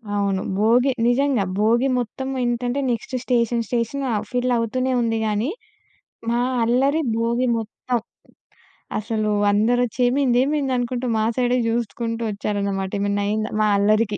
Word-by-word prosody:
అవును. 200 -2 0 0.2
భోగి 240 +5 +4 0.2
నిజంగా 255 -2 +2 0.2
భోగి 235 +5 +3
మొత్తం 265 +3 -4 0.2
ఏంటంటే, 245 +2 -1
నెక్స్ట్ 235 +3 -4
స్టేషన్ 235 -2 +1
స్టేషన్ 245 +3 -1
ఆహ్, 210 -1 -1
ఫిల్ 250 0 0
అవుతూనే 255 +3 -1
ఉంది 225 -1 0
కానీ, 215 +6 0 0.8
మా 235 +1 +1 0.2
అల్లరి 270 +7 +2 0.2
భోగి 235 +2 +1
మొత్తం. 230 +2 -3 1.0
అసలు 215 -1 -1 0.2
అందరొచ్చి, 240 +4 +1
"ఏమైంది? 250 -1 +2
ఏమైంది?" 285 -2 0
అనుకుంటూ 245 +1 -2
మా 215 - +1
సైడే 250 0 +2
చూసుకుంటూ 230 0 -2
ఒచ్చారన్నమాట, 200 -2 -2
ఎమన్నా 200 0 0
అయ్యిందా, 215 +1 -1
మా 215 - +3
అల్లరికి. 210 0 +2
235 Hz, 130 wpm, -22 LUFS, 215-250 Hz, 1.0 s, భోగి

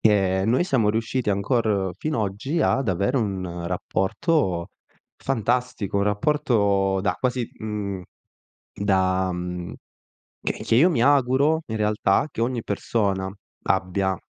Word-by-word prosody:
che 95 -3 +3
noi 125 +9 +3
siamo 125 - +2
riusciti 115 +2 -1
ancor 100 -1 +1
fin 155 0 -2
oggi 110 - -1
ad 135 -4 +1
avere 100 +8 +1
un 95 -5 -3
rapporto 95 - 0 0.5
fantastico, 125 -4 -1
un 100 - +2
rapporto 105 -4 +1
da 100 - 0
quasi, 125 -2 -1
mhmm, 105 -3 -4 0.7
da 95 -2 +1
mhmm, 90 0 -5 0.7
che - - -1
che - - +2
io 155 +10 +6
mi 150 -10 +1
auguro 140 +3 +3
in 110 - -3
realtà 105 +2 +2
che - - -4
ogni 120 -1 -1
persona 100 -2 -1 0.3
abbia. 95 0 0
105 Hz, 125 wpm, -24 LUFS, 95-125 Hz, 0.7 s, io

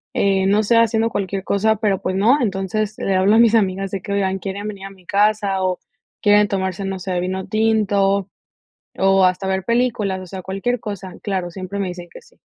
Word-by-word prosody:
eh, 195 -1 +2
no 205 +2 +3
sé, 230 +3 +2
haciendo 230 0 +3
cualquier 195 -1 -3
cosa, 215 +3 +1
pero 205 -3 0
pues 185 - -2
no, 230 +9 +4
entonces 205 0 -2
le 195 - 0
hablo 190 +3 +4
a - - +5
mis 230 -1 +5
amigas 195 -2 +1
de 195 - -4
que 200 - -7
oigan 195 -1 0
quieren 200 +2 -5
venir 200 -2 -7
a - - -7
mi 190 -2 -18
casa 200 -1 +1
o 185 -1 -1 0.4
quieren 205 0 +4
tomarse, 190 0 -2
no 195 0 -3
sé, 180 -1 -2
vino 185 +1 -3
tinto, 205 -3 +1 0.7
o 195 0 +4
hasta 185 +1 0
ver 190 0 -1
películas, 230 -5 0
o 185 - -10
sea, 190 +1 -7
cualquier 195 +7 -2
cosa. 200 -4 -7
Claro, 190 -4 -2
siempre 190 +2 -6
me 195 - -1
dicen 175 -1 -8
que - - -11
sí. 470 - -24
195 Hz, 210 wpm, -20 LUFS, 190-210 Hz, 0.7 s, a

